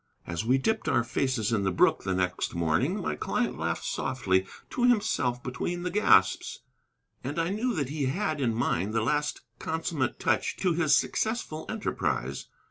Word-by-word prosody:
As 85 +4 -3
we 125 +4 +3
dipped 220 +11 0
our 120 -2 +3
faces 120 -2 0
in 105 - +2
the 95 - +1
brook 90 - +3
the 95 - 0
next 90 -1 -1
morning 85 - +1
my - - -1
client - - -1
laughed - - -2
softly 95 -7 0 0.2
to 245 - -1
himself 130 - +2
between 175 +8 -3
the 180 - -2
gasps, 210 +3 +3 0.6
and 140 +5 -4
I 165 +1 +1
knew 225 +4 -1
that 140 -4 -1
he 145 -1 -1
had 155 0 -1
in 120 -3 +2
mind 110 -3 0
the 110 - +2
last 150 +5 0 0.2
consummate 160 -3 -2
touch - - 0
to 185 -3 +1
his 160 -2 +4
successful 220 -8 -2
enterprise. 65 +3 -2
135 Hz, 170 wpm, -28 LUFS, 110-175 Hz, 0.6 s, his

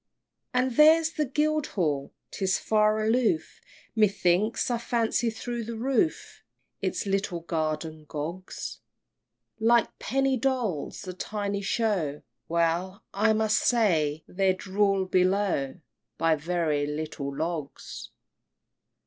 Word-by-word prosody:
IX. - - -57
And 250 -1 +1
there's 320 +1 +6
Guildhall! 280 - 0 0.2
'tis 190 -1 0
far 215 0 +2
aloof 245 +8 +1 0.3
Methinks, 205 +1 +2
I 240 - 0
fancy 235 0 0
through 235 +1 -4
the 230 +1 -5
roof 270 +7 0 0.4
Its - - -1
little 195 -3 -1
guardian 155 -1 -3
Gogs, 165 +6 -6 0.8
Like 235 +1 +3
penny 270 0 +1
dolls 230 - -2
a 185 - -4
tiny 200 +1 -3
show! 195 -9 -1 0.2
Well, 170 +4 0
I 220 +3 +3
must 220 0 +2
say 160 -11 +2
they're 190 0 +1
rul'd 195 -1 +1
below 185 -7 +2 0.4
By 165 -1 +3
very 155 -2 0
little 150 -2 -4
logs! 160 -3 -5
195 Hz, 105 wpm, -27 LUFS, 165-230 Hz, 0.8 s, there's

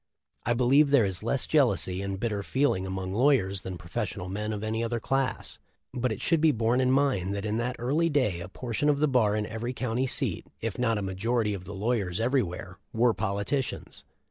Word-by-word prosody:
I 120 - +3
believe 135 +5 +4
there 140 -6 +5
is 95 -2 -2
less 115 +4 0
jealousy 120 -10 +2
and 100 -1 -3
bit 115 - 0
ter 105 -2 -2
feeling 100 -5 0
among 95 0 -4
lawyers 105 -6 +2
than 95 -1 -6
professional 90 +1 -4
men 105 +3 -3
of 105 -1 -4
any 110 +1 -1
other 115 0 -1
class; 135 +3 -2 0.3
but 125 -1 -1
it 110 - -4
should 165 -2 +2
be 160 -1 +5
borne 120 +1 +1
in 130 - +2
mind 130 -9 +2
that 100 +1 -4
in 105 +1 -1
that 120 +2 -1
early 150 +8 +1
day 130 - +1
a 85 +1 -7
portion 125 +7 -1
of 145 - +3
the 150 +2 +2
bar 115 -6 +3
in 105 0 -1
every 115 +3 -4
county 125 +1 -1
seat, - - -2
if 115 -1 -4
not 115 -3 +2
a 105 - -2
majority 105 +3 0
of 90 -2 -6
the 100 +2 -7
lawyers 100 -3 -1
every 125 +4 +2
where, 90 0 -6
were 115 +1 +3
politicians. 100 +9 -3
115 Hz, 215 wpm, -28 LUFS, 100-130 Hz, 0.3 s, there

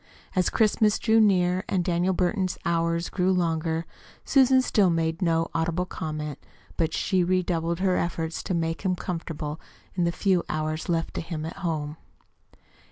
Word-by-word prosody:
As 185 -1 +3
Christmas 215 -1 +3
drew 225 0 +3
near, 185 -3 +3
and 180 -3 0
Daniel 175 +1 +1
Burton's 185 +1 0
hours 170 0 0
grew 185 0 +1
longer, 165 -2 0 0.4
Susan 265 -1 +5
still 205 -6 +3
made 165 0 0
no 165 -2 +1
audible 165 +2 0
comment; 155 -4 -5 0.4
but 165 -1 0
she 185 +1 +1
redoubled 175 -1 0
her 185 -1 +2
efforts 165 -1 -2
to 185 - -2
make 165 -1 -1
him 185 -2 0
comfortable 165 -4 -5 0.3
the 170 -2 +1
few 185 -1 +1
hours 155 +2 -2
left 165 -1 0
to - - -3
him 160 -2 -5
at 165 - -7
home. 155 -3 -3
170 Hz, 155 wpm, -26 LUFS, 165-185 Hz, 0.4 s, Susan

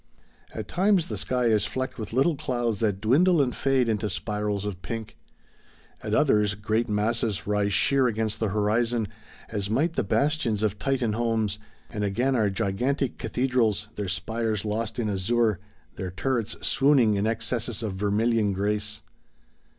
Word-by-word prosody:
At 110 -2 -6
times 190 -2 +2
the 110 - -3
sky 125 +5 -1
is 110 -2 +3
flecked 130 -1 -4
with 110 - -5
little 135 +7 +2
clouds 120 -7 -2
that 105 -4 0
dwindle 155 - +4
and 130 -4 +1
fade 135 -2 +2
into 110 -1 0
spirals 105 +2 -2
of 95 -3 -5
pink; 110 +4 -6 0.9
at - - -1
others 105 -1 +3
great 110 +3 -1
masses 105 -3 0
rise 105 0 +1
sheer 135 +5 +3
against 110 -1 -1
the 110 - +1
horizon, 110 +3 +1 0.4
as 100 -3 -3
might 150 +10 +1
the - - 0
bastions 125 -2 +1
of 105 -1 0
Titan 130 -5 0
homes; 110 -3 0 0.3
and 105 - -4
again 120 +7 +1
are 110 -4 +2
gigantic 120 +8 -1
cathedrals, 115 -3 0
their 100 -3 -4
spires 110 +4 -2
lost 110 +2 -2
in 115 -3 -1
azure, 105 +1 +1 0.4
their 95 - -4
turrets 115 +4 -2
swooning 135 -6 +4
in 100 +1 0
excesses 115 0 -1
of 105 -3 -2
vermilion 105 +2 +1
grace. 105 +2 -2
110 Hz, 155 wpm, -26 LUFS, 105-120 Hz, 0.9 s, dwindle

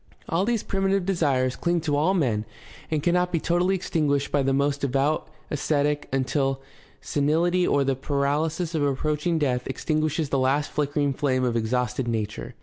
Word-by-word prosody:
All 175 +4 +1
these 230 -1 0
primitive 195 -1 0
desires 140 -9 +1
cling 175 0 0
to 150 -2 0
all 160 +7 +2
men 120 - +1 0.5
and 155 -2 -1
cannot 180 +1 +2
be 165 - +1
totally 175 +4 +1
extinguished 145 -6 0
by 145 - +2
the 135 0 +1
most 140 +1 +1
devout 140 +4 0 0.2
ascetic 145 0 0
until 135 0 0 0.4
senihty 170 +5 +1
or 140 - +3
the 135 0 +1
paralysis 150 +5 -1
of 160 - 0
approach 150 +3 0
ing 170 -2 +2
death 125 -5 0
extinguishes 155 +2 -1
the 135 - +1
last 135 +3 +1
flickering 145 -1 0
flame 130 -2 0
of 120 -2 0
exhausted 120 +2 -1
nature. 110 -2 -3
145 Hz, 165 wpm, -25 LUFS, 135-165 Hz, 0.5 s, or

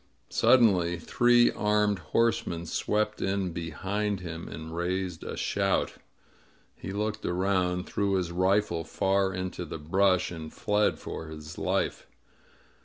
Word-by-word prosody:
Suddenly 95 -9 +4
three 120 +7 +4
armed 105 -1 +1
horsemen 85 -1 0
swept 105 +5 -1
in 95 -2 0
behind 95 +5 -2
him, 85 -1 -6
and 80 +1 -7
raised 90 -1 -2
a - - -5
shout. - - 0 0.8
He 95 - -7
looked 105 +2 -2
around, 90 0 0
threw 100 -1 0
his 90 -2 -1
rifle 95 -1 +1
far 95 +3 +1
into 90 -1 -4
the 80 -1 -6
brush, 90 +4 +2
and 80 -2 -7
fled 105 0 +1
for 80 - -7
his 75 0 -9
life. - - -1
95 Hz, 125 wpm, -28 LUFS, 85-105 Hz, 0.8 s, Suddenly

